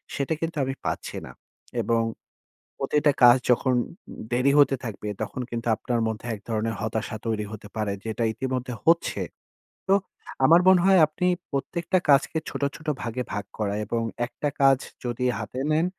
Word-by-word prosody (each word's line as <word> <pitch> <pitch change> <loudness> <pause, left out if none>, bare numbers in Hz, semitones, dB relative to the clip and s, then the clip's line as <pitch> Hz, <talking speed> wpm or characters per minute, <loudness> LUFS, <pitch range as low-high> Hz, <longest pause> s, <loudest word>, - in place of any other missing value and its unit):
সেটা 140 +3 -1
কিন্তু 165 -1 -3
আমি 135 0 -1
পাচ্ছি - - -3
না। - - -10 0.5
এবং 115 -1 +2 0.8
প্রতিটা 145 +1 +2
কাজ 120 +1 +9
যখন 125 +1 +3 0.6
দেরি 130 +3 +3
হতে 140 -1 +5
থাকবে, 105 -2 -5
তখন 110 +4 -4
কিন্তু 120 0 -4
আপনার 120 +1 -1
মধ্যে 110 +1 -5
এক 105 - -9
ধরনের 110 0 -1
হতাশা 110 +1 -2
তৈরি 110 -2 -1
হতে 105 -1 -9
পারে। 105 -2 -1
যেটা 115 +1 -3
ইতিমধ্যে 130 0 -3
হচ্ছে। 170 +1 +3 0.7
তো 195 - +4 0.5
আমার 170 +5 +7
মনে 185 -1 +7
হয় 190 -2 +6
আপনি 180 +4 -1 0.2
প্রত্যেকটা 170 +6 0
কাজকে 140 +3 +4
ছোট, - - -6
ছোট 155 - -12
ভাগে 120 +2 -3
ভাগ 105 0 -3
করা 100 -2 -1
এবং 115 +2 -1 0.2
একটা 130 +4 -3
কাজ 135 -1 +6 0.3
যদি 120 +1 -2
হাতে 130 - -5
নেন, 160 +3 +3
125 Hz, 160 wpm, -25 LUFS, 115-150 Hz, 0.8 s, কাজ